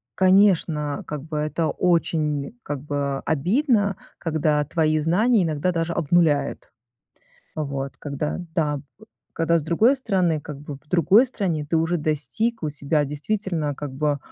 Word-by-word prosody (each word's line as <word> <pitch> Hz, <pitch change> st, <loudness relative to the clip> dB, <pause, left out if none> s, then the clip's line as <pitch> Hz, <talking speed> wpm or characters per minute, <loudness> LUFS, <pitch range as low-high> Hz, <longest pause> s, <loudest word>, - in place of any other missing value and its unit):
конечно, 185 Hz, -6 st, +3 dB
как 150 Hz, -2 st, -5 dB
бы 155 Hz, -1 st, -5 dB
это 155 Hz, +2 st, -1 dB
очень 160 Hz, -1 st, 0 dB
как 145 Hz, -2 st, -4 dB
бы, 145 Hz, -1 st, -4 dB
э, 140 Hz, -1 st, -1 dB
обидно, 200 Hz, -, +1 dB, 0.2 s
когда 155 Hz, -2 st, +1 dB
твои 155 Hz, 0 st, +1 dB
знания 200 Hz, +7 st, +3 dB
иногда 160 Hz, +2 st, 0 dB
даже 165 Hz, 0 st, -1 dB
обнуляют. 165 Hz, -2 st, +1 dB, 0.9 s
Вот, 140 Hz, -2 st, -4 dB
когда 145 Hz, +1 st, -3 dB, 0.2 s
Да, 150 Hz, -3 st, 0 dB, 0.5 s
когда 165 Hz, 0 st, +2 dB
с -, -, -4 dB
другой 220 Hz, -, +3 dB
страны 185 Hz, -, 0 dB
как 145 Hz, -1 st, -8 dB
бы 145 Hz, -1 st, -7 dB
в 150 Hz, -, -24 dB
другой 180 Hz, -, +5 dB
стране 175 Hz, -, -2 dB
ты 165 Hz, -, 0 dB
уже 165 Hz, +2 st, +1 dB
достиг 160 Hz, +9 st, -1 dB
у 150 Hz, -, -1 dB
себя 145 Hz, +1 st, 0 dB
действительно 155 Hz, 0 st, -2 dB
как 145 Hz, -1 st, -6 dB
бы, 145 Hz, +1 st, 0 dB
155 Hz, 145 wpm, -23 LUFS, 150-180 Hz, 0.9 s, другой